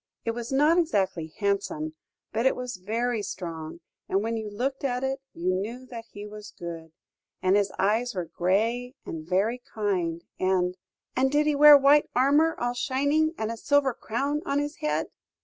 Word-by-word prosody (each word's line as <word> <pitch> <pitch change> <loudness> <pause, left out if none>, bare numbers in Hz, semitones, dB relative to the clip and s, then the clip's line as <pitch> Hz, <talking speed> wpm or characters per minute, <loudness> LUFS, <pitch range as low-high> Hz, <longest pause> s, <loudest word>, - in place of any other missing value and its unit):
It 230 - +1
was 235 +1 -6
not 300 +6 +4
exactly 190 - 0
handsome, 195 -7 -1 0.4
but 230 +4 +2
it - - +2
was 250 -4 -5
very 225 +4 -1
strong, 170 -4 -6 0.3
and 195 +2 +1
when 230 +1 -1
you 220 -1 -4
looked 260 +7 -3
at 250 -1 -1
it, 265 0 -1
you 180 +2 -1
knew 225 +7 -4
that 230 -2 -7
he 205 0 -8
was 210 0 -10
good. 165 -3 -7 0.5
And 185 +1 +4
his 205 -1 +2
eyes 220 +4 +1
were 180 -2 -2
grey 225 - 0
and 160 0 -7
very 215 +7 +1
kind, 180 -6 -1 0.2
and 185 -1 +1 0.2
" - - -51
"And 265 +1 +2
did 295 +1 +3
he 300 - +3
wear 295 0 +9
white 280 +2 +5
armour, 290 +6 +4
all 245 0 0
shining, 285 +6 +1
and 220 0 -2
a 230 - -5
silver 285 0 +2
crown 280 +7 -2
on 280 -5 -1
his 290 +1 -2
head?" 305 -1 -1
230 Hz, 185 wpm, -27 LUFS, 190-270 Hz, 0.5 s, wear